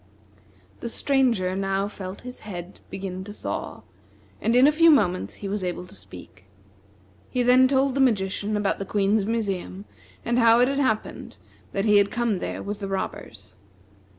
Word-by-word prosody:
The 235 - -5
Stranger 230 -9 +1
now 195 0 -1
felt 190 -2 -8
his 250 0 -9
head 180 -3 -8
begin 190 -1 -5
to 205 - -8
thaw, 205 - -6 0.6
and 230 - +1
in 250 +2 +7
a 295 - +6
few 330 +2 +5
moments 185 - +2
he 200 - -7
was 200 0 -3
able 180 0 -3
to - - -13
speak. 95 0 -11 0.8
He 250 - 0
then 250 +1 +6
told 270 0 +2
the 275 - +1
magician 210 -3 +1
about 205 -1 0
the - - -2
Queen's 200 +1 +1
museum, 200 -3 -3 0.4
and 240 +1 +1
how 230 0 +6
it 250 - +5
had 275 +1 -1
happened 220 -6 -2 0.3
that 195 +1 -1
he 210 -1 +5
had 200 0 +4
come 235 -5 -1
there - - -4
with 205 0 -5
the 200 - -4
robbers. 195 0 -6
205 Hz, 175 wpm, -25 LUFS, 190-245 Hz, 0.8 s, in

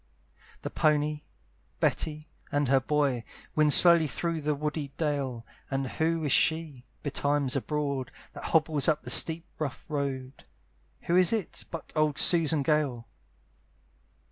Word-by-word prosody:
The - - -4
pony, 150 0 +1 0.6
Betty, 155 0 -1 0.2
and 145 -2 0
her 135 0 +5
boy, 135 -3 0 0.3
Wind 155 -1 +4
slowly 170 0 +8
through 165 +5 -3
the 150 0 0
woody 150 0 -3
dale: 140 -7 -2 0.2
And 135 0 -1
who 160 +4 -1
is 145 - -1
she, 160 -6 +1 0.2
be 145 - -3
times 145 -2 0
abroad, 140 -2 -2 0.2
That - - -9
hobbles 155 -3 +1
up 155 -3 +1
the - - -3
steep 165 +1 +3
rough 145 -4 -5
road? 135 -2 -4 0.6
Who 170 - 0
is 180 -2 +4
it, 220 -5 -3
but 165 - -8
old 155 -1 +1
Susan 160 -4 +2
Gale? 140 -6 0
150 Hz, 140 wpm, -28 LUFS, 140-160 Hz, 0.6 s, slowly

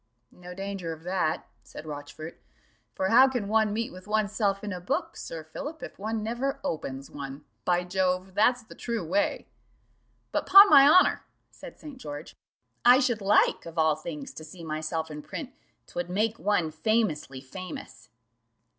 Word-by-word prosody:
"No 180 0 -11
danger 195 -3 -4
of 160 0 -13
that," 180 -3 -1
said 155 - -11
Rochfort; 150 +2 -8 0.5
"for 190 - 0
how 255 +5 +7
can 245 -6 -2
one 220 0 +2
meet 230 +2 -2
with 185 +2 -12
oneself 210 -1 0
in 205 -2 -3
a 180 - -6
book, 180 - -2
Sir 160 -1 -7
Philip, 290 - -7
if - - -9
one 220 +1 -2
never 240 +5 -2
opens 140 - -4
one? 140 +1 -8 0.2
By 180 0 +2
Jove, 185 +1 -1
that's 240 +4 +3
the - - -13
true 230 -7 -3
way." 195 +5 0 0.9
"But, - - -1
'pon 395 0 +10
my 280 -2 +9
honour," 365 +4 +5 0.3
said - - -12
St. 290 -4 -10
George, 145 - -8 0.5
"I 245 +1 +8
should 240 -5 +1
like 200 -3 +3
of 165 0 -10
all 160 -1 +4
things 155 -2 -7
to 155 - -9
see 165 +2 -11
myself 160 0 -3
in 150 0 -6
print; 265 - -7 0.3
'twould 175 0 -5
make 215 +4 0
one 180 -6 +1
famously 160 - 0
famous." 135 -4 -9
185 Hz, 165 wpm, -27 LUFS, 160-220 Hz, 0.9 s, pon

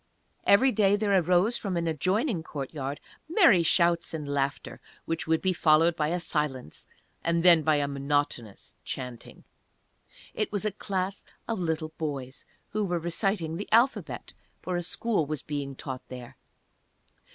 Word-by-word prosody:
Every 255 +7 +6
day 205 -4 +3
there 205 -1 0
arose 180 +5 +3
from 190 -4 -3
an 170 - -1
adjoining 185 - 0
courtyard 140 -2 -5 0.3
merry 325 - +6
shouts 170 0 +2
and 150 -2 -5
laughter, 140 0 -2 0.2
which 165 -1 -3
would 160 0 +1
be 190 -1 +2
followed 165 0 +4
by 150 -2 0
a 175 +3 -1
silence, 150 - -3 0.4
and 170 0 +1
then 170 -3 +7
by 155 0 +3
a 145 -1 +1
monotonous 140 -6 -2
chanting. 125 -2 -7 0.9
It 215 - -2
was 205 0 -2
a 215 - +1
class 195 -1 -3 0.2
of 225 -3 -2
little 160 -2 -2
boys 140 -4 -5 0.2
who 215 0 -1
were 175 -3 0
reciting 170 0 -1
the 205 - -7
Alphabet, 235 +4 +1 0.3
for 180 - -4
a 175 - 0
school 180 -1 -1
was 155 -2 -4
being 140 -2 -4
taught 130 -1 -7
there. 125 -2 -9
165 Hz, 150 wpm, -28 LUFS, 145-195 Hz, 0.9 s, then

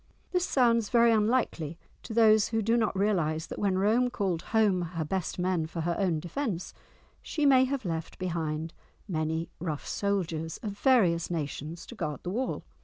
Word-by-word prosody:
This 360 -1 +1
sounds 235 -4 +3
very 235 -1 +5
unlikely 210 - +1 0.2
to - - -9
those 220 -2 +5
who 225 -1 -1
do 225 +3 +2
not 220 -4 +1
realise 170 -6 +1
that - - -7
when 195 -2 +1
Rome 225 +6 +3
called 190 -8 -1
home 210 -5 +3 0.2
her 160 - -1
best 185 +2 -2
men 180 -3 0
for 165 +1 -5
her 170 +1 -1
own 180 -5 +1
defence 180 - -4 0.5
she 300 -2 -1
may 260 -2 +6
have 270 -3 -3
left 165 -2 -4
behind 165 -3 -3 0.3
many 160 -2 -1
rough 160 -4 -4
soldiers, 170 -6 -2
of 210 - -2
various 200 -7 +3
nations, 160 0 -4
to - - -10
guard 155 -9 -4
the 180 - -3
wall. 255 +6 -2
185 Hz, 175 wpm, -29 LUFS, 165-225 Hz, 0.5 s, may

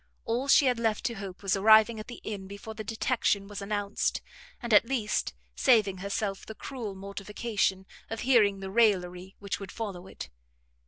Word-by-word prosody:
All 245 +4 -1
she 280 - +6
had 250 -2 +2
left 225 -2 0
to 235 - 0
hope 195 -2 -8
was 195 0 +2
arriving 220 +2 +6
at 215 - -8
the 240 - -9
inn 200 -3 -5
before 200 +3 -8
the 220 0 -6
detection 220 -2 0
was 205 0 -7
announced, 205 0 -1 0.4
and 235 -3 -2
at 205 - +8
least 225 -6 -1 0.2
saving 215 -7 +3
herself 200 0 -3
the 220 - -9
cruel 230 -7 -6
mortification 200 0 -2 0.2
of 225 -1 -4
hearing 210 -6 +3
the 190 0 -6
raillery 190 -4 +1
which 200 -1 -4
would 195 -2 -8
follow 195 -5 -6
it. - - -9
210 Hz, 175 wpm, -28 LUFS, 195-225 Hz, 0.4 s, at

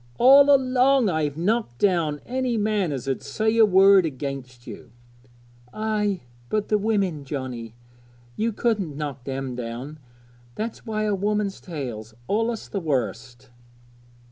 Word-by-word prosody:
All 275 +3 +7
along 260 -2 +4
I've 155 -3 -1
knocked 200 - -1
down 165 -4 +1
any 255 -1 -1
man 205 -5 0
as 135 -1 -5
'ud 135 - -1
say 220 +10 -1
a 220 -1 +7
word 195 0 +6
against 135 -4 -6
you.' - - -10 0.9
'Ay, 210 -3 -1 0.3
but 210 +5 -1
the 210 - +3
women, 195 -8 0
Johnnie; 125 -5 -6 0.6
ye 225 +2 0
couldn't 205 -9 -1
knock 140 -4 -5
them 135 -1 -4
down; 125 +5 -6 0.6
that's 230 +2 -5
why 215 -1 -1
a 210 -1 +1
woman's 205 0 -1
tale's 120 - -6
allus 225 +2 -1
the 200 - -3
worst.' 125 - -3
185 Hz, 135 wpm, -24 LUFS, 135-215 Hz, 0.9 s, All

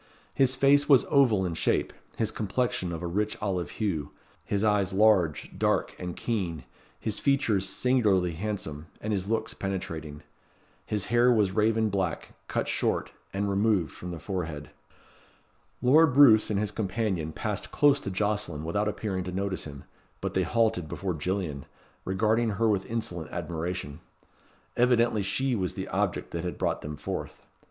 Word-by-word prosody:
His 135 -1 +3
face 140 +2 +4
was 135 -4 +6
oval 120 -9 +4
in 85 - -2
shape, 80 - 0 0.2
his 110 -1 0
complexion 105 -4 -1
of 85 +1 -5
a - - -1
rich 105 +5 -1
olive 95 -4 -2
hue, 90 -10 -1 0.3
his 100 0 -1
eyes 105 -3 +2
large, 95 -7 +3
dark, - - +1
and 90 -1 -5
keen, 90 - -2 0.4
his 110 -2 -2
features 110 -9 +1
singularly 100 -6 +2
handsome, 80 -4 -5
and 105 0 -2
his 95 -1 -2
looks 110 0 -1
penetrating. 80 -6 -5 0.6
His 105 -3 -1
hair 120 +1 +5
was 105 -5 +3
raven 110 +1 +2
black, 95 -5 -2
cut - - -1
short, - - 0 0.2
and 100 +1 -1
removed 100 -3 +1
from 90 - -8
the 85 - -5
forehead. 80 -4 -5 1.1
Lord 145 +2 +5
Roos 115 -7 +7
and 105 -2 0
his 105 0 -1
companion 95 -6 -2
passed - - -4
close 145 -1 +4
to - - -5
Jocelyn 100 -5 -1
without 100 +6 0
appearing 100 -3 -2
to 90 - -4
notice 95 0 -2
him; 70 -3 -9 0.4
but - - -3
they - - +2
halted 110 -8 +1
before 95 -2 -3
Gillian, 80 -3 -3 0.4
regarding 110 +4 +1
her 115 +3 +1
with 100 -3 +1
insolent 90 -8 -3
admiration. 85 -2 -4 0.8
Evidently 120 -3 +3
she 125 +7 0
was 95 -5 -2
the - - -4
object - - -1
that 85 0 -3
had 90 - -4
brought - - -1
them 75 0 -6
forth. 75 - -6
100 Hz, 160 wpm, -28 LUFS, 90-110 Hz, 1.1 s, Roos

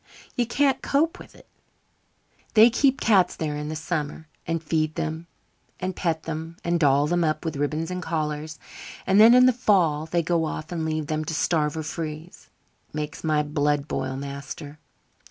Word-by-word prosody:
You 240 -3 0
can't 275 +3 +2
cope 315 +4 +1
with - - -13
it. - - -18 1.1
They 225 +2 +8
keep 270 +2 +2
cats 195 -5 +3
there 150 -2 -3
in 150 0 -4
the 155 - -4
summer 155 -1 -4 0.2
and 165 0 -2
feed 155 0 0
them 160 +1 -4 0.5
and 185 0 -3
pet 160 -2 -1
them 165 +1 -6
and 170 0 +1
doll 145 -2 +4
them 175 +2 +1
up 155 +2 -1
with 160 -2 -2
ribbons 155 +4 -2
and 180 0 -3
collars; 155 -2 -3 0.5
and 195 +2 +4
then 230 +2 +9
in 250 0 +7
the 255 - +5
fall 175 -10 +2
they 170 +1 0
go 165 0 +1
off 155 +1 -5
and 165 -2 -2
leave 155 -1 -1
them 155 0 -2
to 160 - -3
starve 150 0 +1
or 160 - -3
freeze. 155 +2 -7 0.4
It - - -14
makes 150 0 -5
my 155 -2 +2
blood 145 -1 0
boil, 130 - -3
master." 140 +2 -7
160 Hz, 185 wpm, -25 LUFS, 150-175 Hz, 1.1 s, then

